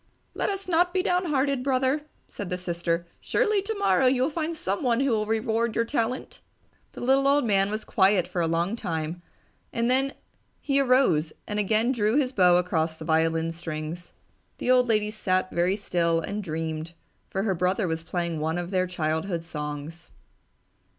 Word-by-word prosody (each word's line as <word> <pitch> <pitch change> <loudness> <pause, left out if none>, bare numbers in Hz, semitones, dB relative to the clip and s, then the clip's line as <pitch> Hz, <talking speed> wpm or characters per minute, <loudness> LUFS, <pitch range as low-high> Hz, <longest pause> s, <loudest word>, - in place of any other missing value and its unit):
"Let - - -1
us 390 -1 -4
not 355 +1 +2
be 370 - +2
downhearted, 290 -8 +1
Brother!" 265 +2 +1 0.3
said 200 -3 -7
the 180 - -1
sister. 170 -1 -2
"Surely 425 -1 +1
tomorrow 400 -10 +2
you 255 0 +3
will 285 - 0
find 325 +1 -2
someone 235 0 0
who 275 -1 +2
will 215 -2 0
reward 225 +1 0
your 230 - +2
talent!" 235 0 -2 0.5
The - - -9
little 270 +2 +3
old 285 -1 +3
man 195 -2 +2
was 215 +1 -4
quiet 190 -2 +3
for 180 -1 -2
a 165 - +1
long 170 +6 0
time 165 -4 -4 0.5
and 235 +1 0
then 270 +2 +1 0.4
he 275 -1 +1
arose 250 - +3
and 210 0 -2
again 220 +4 +2
drew 220 -2 +1
his 265 -4 +2
bow 180 -7 +5
across 165 -3 0
the 160 - -8
violin 160 0 +1
strings. 165 +1 -6 0.5
The 250 - 0
old 250 -1 +5
lady 210 -2 +1
sat 185 -3 0
very 175 +3 +1
still 170 -5 0
and 205 +5 -4
dreamed, 160 -1 -4 0.4
for 195 - -2
her 200 -3 +1
brother 185 +3 0
was 160 -1 -2
playing 170 -1 -3
one 160 +2 -1
of 175 +1 -4
their 185 -1 +1
childhood 165 0 -2
songs. 150 +1 -6
195 Hz, 175 wpm, -26 LUFS, 170-255 Hz, 0.5 s, bow